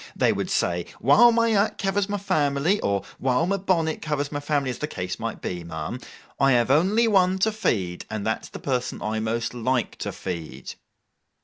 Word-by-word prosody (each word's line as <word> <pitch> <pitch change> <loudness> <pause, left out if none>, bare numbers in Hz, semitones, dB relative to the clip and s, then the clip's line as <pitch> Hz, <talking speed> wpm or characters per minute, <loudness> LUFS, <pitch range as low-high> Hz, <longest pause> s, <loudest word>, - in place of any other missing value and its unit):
They - - +3
would - - -3
say, - - 0
"While 240 0 +6
my 230 0 +2
hat 210 -1 +2
covers 195 +1 0
my 205 - -1
family," 170 -1 +1
or 100 -1 0 0.2
"while 130 +4 +2
my 195 +2 0
bonnet 170 -4 0
covers 145 -2 -2
my 145 - -2
family,"—as 145 -3 -1
the 150 - -2
case 90 -10 -5
might - - -5
be, 90 -1 -4
ma'am—"I 115 - -2
have 120 +1 +3
only 195 +10 +4
one 190 -3 +3
to 220 +4 +2
feed, 95 - -1
and 110 -2 -4
that's 110 0 -2
the - - -8
person 125 -3 -2
I 110 +1 -1
most 115 +2 -2
like 125 0 -1
to - - -4
feed." 80 -8 -6
140 Hz, 185 wpm, -24 LUFS, -, 0.2 s, While